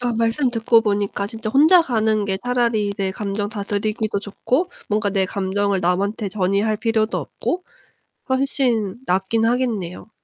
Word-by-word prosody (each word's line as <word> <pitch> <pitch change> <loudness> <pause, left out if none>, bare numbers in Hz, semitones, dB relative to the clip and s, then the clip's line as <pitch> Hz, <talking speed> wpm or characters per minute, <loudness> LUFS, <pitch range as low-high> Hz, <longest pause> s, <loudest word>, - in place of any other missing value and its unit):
아 245 -1 -1
말씀 230 +4 +1
듣고 230 -1 +3
보니까 205 -2 -1
진짜 220 0 -4
혼자 320 +7 +6
가는 220 -5 +1
게 190 -1 0
차라리 235 -5 0
내 195 -1 -1
감정 205 +1 -3
다스리기도 215 +1 -2
좋고 255 - -1 0.2
뭔가 210 -1 +1
내 190 -1 +2
감정을 200 0 -1
남한테 200 +4 0
전이할 200 +2 0
필요도 220 -1 0
없고 360 +1 -3 0.7
훨씬 255 -6 +1
낫긴 195 +5 +1
하겠네요. 225 -6 -1
215 Hz, 310 characters per minute, -21 LUFS, 200-235 Hz, 0.7 s, 혼자